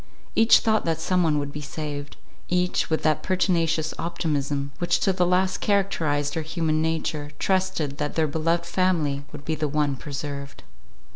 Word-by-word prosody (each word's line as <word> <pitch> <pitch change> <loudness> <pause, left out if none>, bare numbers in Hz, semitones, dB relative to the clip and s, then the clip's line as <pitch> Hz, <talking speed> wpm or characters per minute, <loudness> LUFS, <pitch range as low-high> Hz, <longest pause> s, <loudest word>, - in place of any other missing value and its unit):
Each 225 +1 +7
thought 220 -1 +2
that 165 -1 0
someone 165 -3 +2
would 145 -1 -2
be 150 - -6
saved; 145 -1 -6 0.3
each, 180 0 +1
with 160 - 0
that 155 -1 +2
pertinacious 165 -4 +1
optimism, 145 -4 -1
which 175 -1 +2
to 195 - +3
the 180 -1 +2
last 185 +1 +2
characterized 160 -8 +1
our 160 - 0
human 160 -1 0
nature, 160 -2 -1
trusted 185 -7 0
that 150 - -2
their 160 - +3
beloved 165 +3 0
family 170 -6 +1
would 145 -1 -10
be 160 - -1
the 155 0 -1
one 145 -1 0
preserved. 140 0 -6
160 Hz, 160 wpm, -25 LUFS, 145-180 Hz, 0.3 s, Each